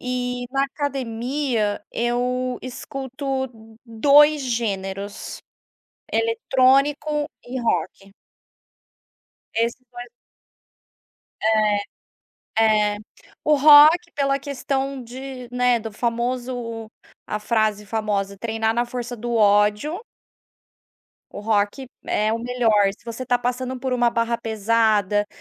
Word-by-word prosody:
E, 250 0 -3
na 275 0 +2
academia, 260 -5 -2
eu 250 +1 -1
escuto 265 +1 -4 0.4
2 290 +6 +5
gêneros: 200 -5 -4 0.7
eletrônico 270 +6 +2 0.2
e 255 +2 -4
rock. 195 -2 -2 1.4
Esses 230 +1 +1 0.2
dois 245 0 -9 2.5
É, 225 - +5 0.3
é. - - -10 0.5
O 300 - +4
rock 305 +4 +7
pela 275 -1 +1
questão 275 -1 -3
de 255 +1 -8
né, 250 -1 +3
do 225 -1 -7
famoso 235 -1 -3 0.4
a 210 - -2
frase 215 -1 0
famosa 200 -2 -2
"treinar 225 +1 -1
na 240 +1 +1
força 245 0 -5
do 240 +1 -4
ódio". 210 - +3 1.3
O - - -7
rock 210 +4 0 0.2
é 215 +1 +1
o 225 - -1
melhor. 230 -4 +2
Se - - -27
você 235 +2 -6
tá 245 0 +2
passando 250 +1 -3
por 260 0 -3
uma 240 -1 +3
barra 230 0 0
pesada, 215 -2 +1
240 Hz, 100 wpm, -22 LUFS, 220-265 Hz, 2.5 s, rock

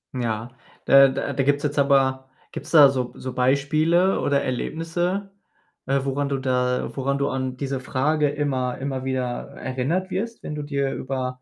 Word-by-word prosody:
Ja, 115 -2 -2 0.4
da 135 0 +8
da 135 +1 -3
da 135 - 0
gibt's 145 +1 +1
jetzt 145 -1 -1
aber 135 -1 +2 0.2
gibt's 145 - -7
da 145 -4 +8
so 130 -2 -2
so 130 -1 -6
Beispiele 155 +8 +2
oder 140 -1 +1
Erlebnisse, 175 +9 -2 0.6
äh, 135 +1 +1
woran 140 +1 -1
du 140 - 0
da 125 -1 -1
woran 140 +1 -1
du 140 0 0
an 130 -1 -3
diese 135 -1 -3
Frage 145 +4 0
immer 135 -4 -1
immer 135 -1 -4
wieder 130 -1 -1 0.3
erinnert 145 +9 -2
wirst, 230 +5 -4
wenn - - -5
du 150 - -4
dir 140 -2 -2
über 130 -1 -4
135 Hz, 170 wpm, -23 LUFS, 130-145 Hz, 0.6 s, da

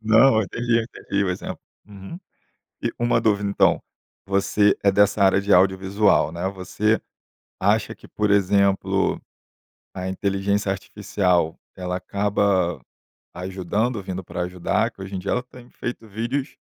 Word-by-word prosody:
Não, 110 +3 +5
eu - - +3
entendi 115 +3 0
entendi 100 -3 -3
o - - -1
exemplo, 90 - -5 0.3
uhum, 100 - -10 0.6
e - - -1
uma 120 0 +2
dúvida, 100 -3 +1
então - - +3 0.4
você 100 +1 +2
é 100 - +4
dessa 105 +1 +3
área 95 0 +4
de 100 +1 +2
audiovisual, 95 -2 +3
né. 85 +3 -3
Você 100 +3 0 0.6
acha 105 +3 +1
que, - - -16
por 105 -1 -1
exemplo, 100 0 +2 0.8
a 95 0 -5
inteligência 100 +1 0
artificial, 90 -4 -1 0.2
ela 90 0 -3
acaba 95 -4 0 0.5
ajudando, 95 +5 -2
vindo 95 0 -4
para 90 +1 -5
ajudar 90 +6 -1
que - - -14
hoje 95 +1 -6
em 95 - -2
dia 100 - -3
ela 125 - +1
tem 125 -1 -15
feito 120 -2 -6
vídeos 120 +7 -3
100 Hz, 145 wpm, -23 LUFS, 95-110 Hz, 0.8 s, Não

